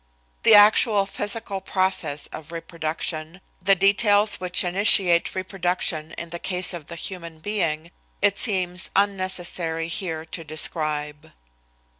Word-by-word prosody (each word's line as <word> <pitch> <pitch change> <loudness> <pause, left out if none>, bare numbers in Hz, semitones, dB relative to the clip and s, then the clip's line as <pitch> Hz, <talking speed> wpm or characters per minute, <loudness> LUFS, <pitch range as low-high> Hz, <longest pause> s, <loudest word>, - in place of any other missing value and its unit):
The 220 - +6
actual 205 0 +5
physical 205 0 -3
process 185 -7 -1
of 155 +1 -10
reproduction, 165 0 -5 0.2
the 195 +2 +4
details 205 +2 +3
which 180 0 +2
initiate 180 -1 +4
reproduction 180 -4 -2
in 170 -1 -8
the 170 - -5
case 180 0 +1
of 165 -4 -9
the 170 - -8
human 170 -2 -7
being, 165 -3 -3 0.3
it 200 -1 +1
seems 185 -4 -1
unnecessary 185 -4 -1
here 165 -3 -4
to 165 0 -7
describe. 155 -1 -4
180 Hz, 120 wpm, -23 LUFS, 160-195 Hz, 0.3 s, The